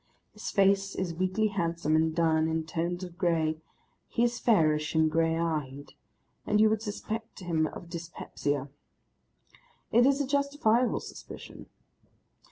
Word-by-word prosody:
His 210 - -6
face 195 0 +2
is 180 -3 -2
weakly 185 +5 0
handsome 170 -5 0
and 160 0 +2
done 160 -1 +3
in 160 0 -1
tones 170 +3 -2
of 175 -1 -9
grey, 160 -3 +1 0.5
he 235 - 0
is 240 -1 +1
fairish 155 -8 +2
and 160 -1 +3
grey 165 0 +2
eyed, 150 -4 -3 0.5
and 210 - +1
you 215 0 +5
would 220 -1 0
suspect 220 0 -5
him 165 -3 +1
of 170 - -9
dyspepsia. 160 -4 -4 1.2
It 240 +2 +5
is 275 0 +3
a 285 - +1
justifiable 275 -4 +1
suspicion. - - -10
170 Hz, 140 wpm, -29 LUFS, 160-215 Hz, 1.2 s, you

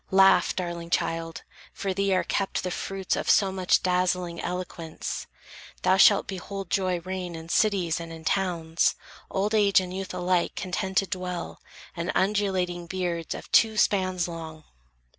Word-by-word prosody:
Laugh, 190 0 +5
darling 170 -2 -4
child; 165 -1 -1 0.3
for 195 -1 -3
thee 195 +1 0
are 185 - +3
kept 195 -1 -1
the 180 - -2
fruits 195 +1 -2
Of - - -3
so 195 -2 +4
much 185 -1 +2
dazzling 180 -1 0
eloquence. 175 -3 -5 0.6
Thou 190 - +4
shalt 200 0 +6
Behold 195 0 -6
joy 185 -3 +1
reign 185 -1 -5
in 165 0 -9
cities 185 -5 +2
and 165 0 -7
in 160 -1 -10
towns, 170 -4 +1 0.3
Old 205 +3 -1
age 205 -3 +5
and 185 -1 -5
youth 190 -1 -4
alike 180 -1 0
contented 190 +1 -1
dwell, 180 -2 -4 0.3
And 170 0 -2
undulating 190 -3 0
beards 175 -2 -3
of - - -10
two 220 -1 +5
spans 185 -3 +2
long! 160 -2 -8
185 Hz, 150 wpm, -26 LUFS, 170-195 Hz, 0.6 s, shalt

